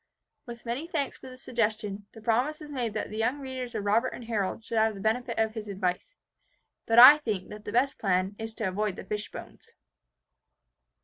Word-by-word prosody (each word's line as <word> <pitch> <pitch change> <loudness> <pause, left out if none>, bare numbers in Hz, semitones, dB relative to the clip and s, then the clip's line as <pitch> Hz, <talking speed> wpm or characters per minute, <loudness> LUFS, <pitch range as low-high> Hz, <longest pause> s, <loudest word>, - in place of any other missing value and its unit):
With 235 0 -9
many 245 +8 -3
thanks 300 -6 -2
for 260 - -10
this 255 +1 -12
suggestion, 210 -4 -2
the 225 - -13
promise 250 +7 +1
was 300 -2 -10
made 240 -6 -3
that 215 - -3
the 215 - -5
young 250 +6 0
readers 260 -3 -6
of 205 -2 -3
Robert 225 +5 +3
and 245 - -7
Harold 220 -2 -2
should 225 0 -1
have 220 -1 +2
the - - -9
benefit 230 +3 -1
of 220 -1 +1
his 220 -2 -6
advice. 195 - -3 0.7
But 225 - +2
I 275 +5 +11
think 210 -9 -3
that 210 0 -10
the - - -4
best 255 +5 +1
plan 190 0 0
is 225 0 -6
to 215 - -2
avoid 200 +1 -1
the - - -9
fish 210 0 -4
bones. 455 - -11
225 Hz, 205 wpm, -28 LUFS, 210-255 Hz, 0.7 s, I